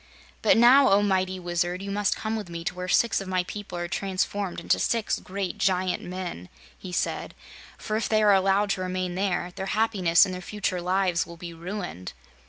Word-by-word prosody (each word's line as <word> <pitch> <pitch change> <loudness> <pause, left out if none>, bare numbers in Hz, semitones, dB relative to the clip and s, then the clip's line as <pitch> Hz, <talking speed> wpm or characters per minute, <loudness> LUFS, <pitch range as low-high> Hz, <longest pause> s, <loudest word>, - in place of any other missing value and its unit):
"But - - +4
now, 255 +4 +7
O 200 +1 +4
mighty 190 -2 0
Wizard, 175 +1 -2
you 200 - -5
must 205 0 +1
come 220 0 -3
with 210 -5 -5
me 170 -1 -6
to 180 - -2
where 180 0 -5
six 230 +4 +2
of 195 - -7
my 185 -1 0
people 195 -1 -7
are 175 0 -3
transformed 195 0 -2
into 170 - +1
six 230 -2 0
great 190 -1 -5
giant 185 -1 +1
men," 180 - -6 0.3
he 185 - -9
said, 175 - -2 0.4
"for 215 - -4
if 225 - -2
they 215 -1 +3
are 205 -1 +6
allowed 195 +1 +3
to 185 - -1
remain 185 -1 -2
there, 180 -1 -1
their 190 - -4
happiness 195 -7 +4
and 185 - -5
their 180 - -6
future 185 -2 -3
lives 180 -1 +1
will 170 0 -10
be 170 0 -8
ruined." 175 - -6
185 Hz, 200 wpm, -26 LUFS, 180-200 Hz, 0.4 s, now